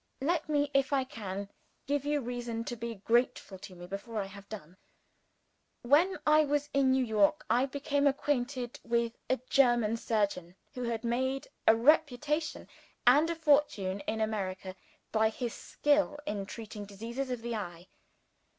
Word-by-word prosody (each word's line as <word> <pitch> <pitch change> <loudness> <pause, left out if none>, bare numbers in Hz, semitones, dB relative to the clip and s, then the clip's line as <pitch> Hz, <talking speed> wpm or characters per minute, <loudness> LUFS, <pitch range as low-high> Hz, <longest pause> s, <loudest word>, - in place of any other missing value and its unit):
Let 320 +2 0
me, 290 -1 +1
if 275 0 +2
I 275 -2 +2
can, 200 -6 -6 0.4
give 285 0 -1
you 295 0 +1
reason 240 -2 -4
to 240 - -5
be 235 0 -5
grateful 220 -2 0
to 185 -1 -10
me, 175 0 -10
before 200 +4 -5
I 200 - -1
have 200 +1 -12
done. 185 -4 -9 1.1
When 315 +10 +4
I 305 0 +6
was 290 0 -1
in 275 -1 +3
New 260 0 +3
York, 205 -3 +2
I 255 +3 +3
became 285 +1 0
acquainted 260 -3 -1
with 235 0 0
a 260 - +2
German 240 -5 +4
surgeon, 200 -6 -1 0.2
who 250 - -6
had 235 -2 -2
made 260 +3 -1 0.2
a 220 - +8
reputation 300 +4 +2 0.4
and 290 +7 +6
a 335 - -1
fortune 285 -12 +2
in 220 0 -1
America 190 -3 -3 0.4
by 220 0 +3
his 235 +1 -4
skill 295 0 +1
in 200 -7 -3
treating 215 -1 -7
diseases 230 +7 -5
of 245 -2 -4
the 235 0 -3
eye. 175 -5 -5
240 Hz, 160 wpm, -31 LUFS, 210-280 Hz, 1.1 s, a